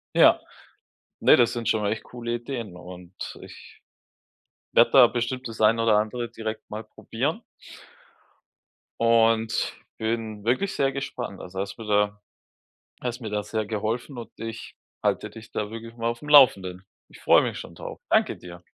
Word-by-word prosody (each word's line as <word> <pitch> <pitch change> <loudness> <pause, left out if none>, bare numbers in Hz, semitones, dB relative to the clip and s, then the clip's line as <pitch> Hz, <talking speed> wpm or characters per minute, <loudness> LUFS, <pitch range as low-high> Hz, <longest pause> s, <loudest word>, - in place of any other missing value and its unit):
Ja. - - +7 0.8
Ne, - - +7
das 120 -1 +4
sind 120 -2 -3
schon 110 -2 +1
echt 110 +2 -1
coole 120 -1 -4
Ideen 120 -6 -6
und 90 0 -11 0.3
ich, - - -14 0.9
werde 115 - +6
da 130 -3 +9
bestimmt, 125 +2 -3
dass 115 -1 -7
ein 110 +2 +5
oder 115 -2 +4
andere 115 +2 -2
direkt 110 -1 -6
mal 110 +1 -5
probieren. 110 - -3 1.6
Und 115 -1 +3 0.2
bin 110 -2 -3
wirklich 185 +12 +1
sehr 135 -1 +2
gespannt. 125 -7 -5
Also 95 +1 -7
hast 100 +2 -4
mir 115 - -8
da 105 0 +1 0.8
hast 125 0 -4
mir 110 -3 -5
da, 105 0 -1
sehr 110 0 -2
geholfen 115 +5 -3
und 115 - -8
ich 115 0 -7 0.3
halte - - 0
dich 115 0 -12
da 105 0 -3
wirklich 115 +1 -9
mal 115 0 -1
aufm 120 +5 -5
Laufenden. 95 -10 +6 0.2
Ich - - -16
freue - - +6
mich - - -3
schon - - -9
drauf. - - -8
Danke - - +3
dir. 85 -1 -11
115 Hz, 160 wpm, -25 LUFS, 105-120 Hz, 1.6 s, da